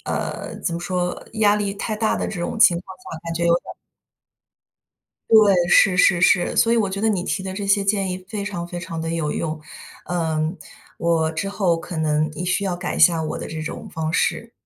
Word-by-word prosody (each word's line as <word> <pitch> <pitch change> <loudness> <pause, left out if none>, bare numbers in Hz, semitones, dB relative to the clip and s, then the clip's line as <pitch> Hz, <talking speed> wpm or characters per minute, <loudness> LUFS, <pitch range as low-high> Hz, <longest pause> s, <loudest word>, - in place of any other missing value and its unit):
呃， - - -4
怎 170 - -1
么 170 - -4
说？ 180 0 -2
压 210 -1 +3
力 200 -1 -2
太 215 +2 -3
大 220 0 0
的 - - -2
这 180 - -5
种 175 - -3
情 195 -6 +7
况 190 +1 -12
下， 165 - -7
感 165 0 -4
觉 170 - -2
有 170 - +4
点 175 - 0
儿 - - -9 1.6
对， 215 -3 +7
是 190 -1 +5
是 180 -2 +4
是。 180 0 +3
所 230 - +4
以 - - +3
我 215 -4 +2
觉 195 +1 -4
得 220 - +2
你 190 -4 0
提 190 - -2
的 190 0 -5
这 200 +1 -4
些 200 0 +3
建 195 -1 +1
议 180 - -2
非 205 -2 -4
常 175 -4 -4
非 175 0 -6
常 170 -2 -6
地 165 0 -3
有 165 -3 -1
用。 155 -1 -3 0.5
嗯， 160 -1 -1 0.4
我 165 -1 +1
之 180 +5 -3
后 190 -4 +1
可 170 0 -7
能 155 0 +1
一 180 - -5
需 180 +3 0
要 185 -2 -1
改 175 - -4
一 - - -4
下 165 -2 +5
我 155 - -3
的 - - -6
这 155 0 -5
种 155 - -6
方 160 0 -3
式。 230 +6 0
180 Hz, 245 characters per minute, -22 LUFS, 165-200 Hz, 1.6 s, 情